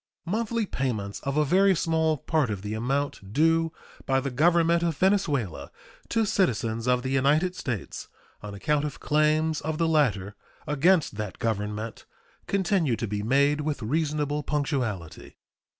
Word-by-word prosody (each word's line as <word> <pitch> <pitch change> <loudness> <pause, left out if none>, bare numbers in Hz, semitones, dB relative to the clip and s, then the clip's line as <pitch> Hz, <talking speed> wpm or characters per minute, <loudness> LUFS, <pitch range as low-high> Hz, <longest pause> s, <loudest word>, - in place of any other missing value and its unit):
Monthly 225 +4 -1
payments 110 - -3
of 140 +1 -3
a 150 - +3
very 190 +5 +4
small 160 -2 +1
part 150 -2 0
of 100 -2 -4
the 105 +1 -4
amount 120 -3 -2
due 165 +3 +3 0.4
by 135 0 +3
the 135 0 -3
Government 170 +4 +3
of 165 -4 -1
Venezuela 150 - 0 0.4
to 225 -1 +1
citizens 115 - 0
of 125 0 +2
the 130 - -2
United 150 +7 +2
States 120 - -5 0.3
on 105 -1 -7
account 145 +9 0
of 150 - -5
claims 155 +1 +1
of 155 +1 -3
the 165 0 +1
latter 110 -11 +1 0.3
against 155 - +2
that 105 -3 -5
Government 110 0 -3 0.4
continue 190 - +1
to 115 - -3
be 105 0 -3
made 140 +6 +2
with 145 -4 -3
reasonable 150 +2 -1
punctuality. 130 - -3
145 Hz, 150 wpm, -26 LUFS, 115-165 Hz, 0.4 s, very